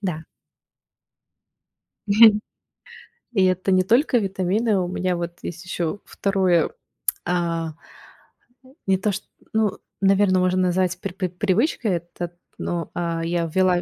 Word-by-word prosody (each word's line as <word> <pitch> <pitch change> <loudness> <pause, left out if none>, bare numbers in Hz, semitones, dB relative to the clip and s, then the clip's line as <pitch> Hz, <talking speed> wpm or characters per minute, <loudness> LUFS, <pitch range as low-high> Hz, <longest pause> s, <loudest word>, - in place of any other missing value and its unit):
Да. 170 -6 -3 1.8
Мгм. 210 +1 +7 0.9
И 195 -4 +4
это 185 +1 +1
не 185 0 +4
только 245 - +3
витамины. 195 +1 +1
У 180 - -1
меня 185 0 -1
вот 170 0 -5
есть 175 +2 -6
ещё 180 0 -2
2, 190 -4 +1 0.5
а, 170 -2 -1 1.1
не 190 -1 +4
то 205 +3 0
чт 200 - -5 0.3
ну, 220 -3 +1 0.2
наверное, 195 -1 +4
можно 185 0 +2
назвать 180 0 +1
пр 195 -3 -4
пр 185 -1 -2
привычкой 210 - 0
это, 175 0 -5 0.2
но, 170 -2 -3
э, 170 -1 -1
я 170 0 0
ввела 185 -1 +3
185 Hz, 125 wpm, -23 LUFS, 175-200 Hz, 1.8 s, Мгм